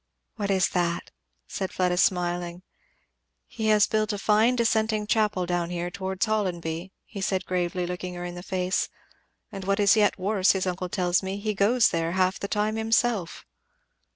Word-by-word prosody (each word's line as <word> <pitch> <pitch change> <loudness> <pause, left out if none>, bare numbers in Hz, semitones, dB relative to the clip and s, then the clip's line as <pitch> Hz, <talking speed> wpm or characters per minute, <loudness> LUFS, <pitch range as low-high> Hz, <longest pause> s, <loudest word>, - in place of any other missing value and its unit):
"What 205 -3 -3
is 190 -1 +3
that?" 170 -2 -1 0.4
said 190 - -4
Fleda 180 -1 +1
smiling. 175 -1 0 0.8
"He 220 -1 -4
has 215 -1 +5
built 215 0 0
a 205 - -3
fine 215 +4 +3
dissenting 220 -2 +1
chapel 210 -4 +1
down 175 -1 -1
here 175 0 -3
towards 190 0 -2
Hollonby," 180 -5 -2
he 200 - -8
said 190 -1 -1
gravely, 180 0 -1
looking 180 0 -5
her 175 0 -5
in 175 - -5
the 175 - -7
face, 185 0 -1 0.6
"and 195 -1 -7
what 195 +1 0
is 200 +1 +5
yet 210 -2 +3
worse, 195 0 +2
his 190 -1 -1
uncle 180 0 -3
tells 175 -1 +1
me, 190 +1 -4
he 215 +1 -2
goes 220 +4 +3
there 165 -1 -1
half 185 0 +1
the 200 - -3
time 215 +1 0
himself!" 225 -4 0
190 Hz, 175 wpm, -26 LUFS, 180-210 Hz, 0.8 s, has